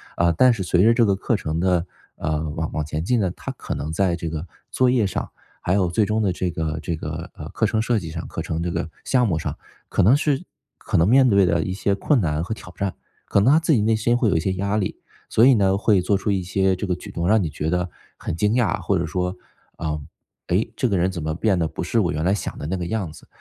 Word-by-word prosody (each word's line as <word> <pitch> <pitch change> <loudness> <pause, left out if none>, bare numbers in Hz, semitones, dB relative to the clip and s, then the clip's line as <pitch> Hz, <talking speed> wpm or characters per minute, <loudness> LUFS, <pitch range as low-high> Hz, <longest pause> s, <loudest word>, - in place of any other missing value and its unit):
呃， 85 0 +3
但 125 +9 +5
是 105 -4 -3
随 90 0 +3
着 115 +2 +6
这 120 0 +4
个 100 -2 +2
课 110 +3 0
程 80 -3 -2
的， 90 -1 +2 0.3
呃， 75 0 -2
往 80 +1 -3
往 75 -2 -2
前 75 +1 -3
进 120 +6 +1
呢， 95 -4 +1
他 - - -6
可 - - -5
能 75 +3 -4
在 90 +1 +1
这 85 -1 -4
个 80 +2 -5 0.2
作 130 -1 +3
业 125 -4 +3
上， 95 - -3 0.3
还 90 - 0
有 95 -3 +2
最 105 +5 +2
终 110 +1 0
的 95 - +1
这 90 0 -2
个 80 -1 -3
这 85 - -2
个， 80 +1 -6
呃， - - -8
课 - - 0
程 110 - 0
设 115 0 +1
计 85 - -7
上， 85 +1 -6
课 - - -5
程 80 0 -3
这 85 - -2
个 85 -1 -3 0.2
项 125 -3 +3
目 80 -6 0
上， - - -3 0.3
可 - - +1
能 115 +10 +6
是 145 -3 0 0.4
可 - - -1
能 80 - +4
面 130 +3 +5
对 100 -3 +5
的 85 -1 +2
一 95 - -3
些 100 +1 0
困 125 +8 +2
难 80 -5 0
和 100 +5 -3
挑 90 -4 -12
战， 100 -1 -2 0.3
可 - - +2
能 125 +8 +5
他 155 - +6
自 165 -1 +2
己 115 - +3
内 110 +1 +3
心 120 +2 +2
会 120 -3 +2
有 - - +1
一 - - +3
些 95 +4 -1
压 100 +2 -1
力， 100 -3 -2 0.3
所 115 - +5
以 135 - +7
呢， 95 -4 +3
会 100 -2 +3
做 100 +3 +1
出 100 - -1
一 95 -1 0
些 95 +1 +1
这 95 +2 -4
个 90 - 0
举 - - -10
动， 85 0 -2
让 110 0 +4
你 - - -1
觉 75 +1 -3
得 90 +1 -1 0.3
很 - - -4
惊 105 +5 +1
讶， 115 -7 +1
或 100 - +1
者 85 - -1
说： 90 +2 -2 0.4
“呃， 75 -1 -3 0.5
诶， 110 +6 0
这 125 - 0
个 100 - +1
人 90 +2 +1
怎 85 - -5
么 80 0 -2
变 95 -1 +1
得 80 - +1
不 - - -5
是 - - +1
我 - - +1
原 75 +1 -2
来 95 - +3
想 105 - -4
的 - - -6
那 85 +5 -2
个 85 -2 -3
样 100 -7 -2
子？” - - -15
95 Hz, 300 characters per minute, -23 LUFS, 85-110 Hz, 0.5 s, 以